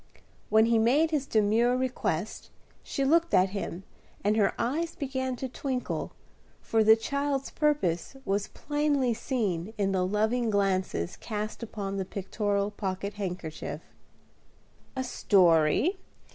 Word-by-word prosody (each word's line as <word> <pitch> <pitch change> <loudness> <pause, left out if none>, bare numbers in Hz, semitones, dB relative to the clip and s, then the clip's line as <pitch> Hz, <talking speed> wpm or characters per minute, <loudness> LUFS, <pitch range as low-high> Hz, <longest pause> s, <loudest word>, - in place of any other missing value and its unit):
When 220 +1 +5
he 230 -1 +3
made 285 +8 +3
his 285 -3 0
demure 225 +3 +3
request, 255 0 -2 0.3
she 275 - -2
looked 335 +4 +3
at 185 +1 +4
him, 195 -2 -5 0.4
and 210 +2 +2
her 210 -2 +2
eyes 320 +8 -1
began 260 -2 -2
to 265 - -4
twinkle, 255 0 -3 0.5
for 225 -1 +1
the 220 +1 +8
child's 280 +3 -2
purpose 280 - 0
was 200 +1 0
plainly 290 -4 0
seen 215 -5 -2
in 195 -1 +1
the 185 -1 +1
loving 220 +5 +1
glances 190 - 0
cast 215 0 -5
upon 200 -3 -4
the 190 - -2
pictorial 200 +1 -1
pocket 200 0 -4
handkerchief. 180 -6 -5 1.1
"A 260 - -1
story? 190 - +3
220 Hz, 130 wpm, -28 LUFS, 195-260 Hz, 1.1 s, the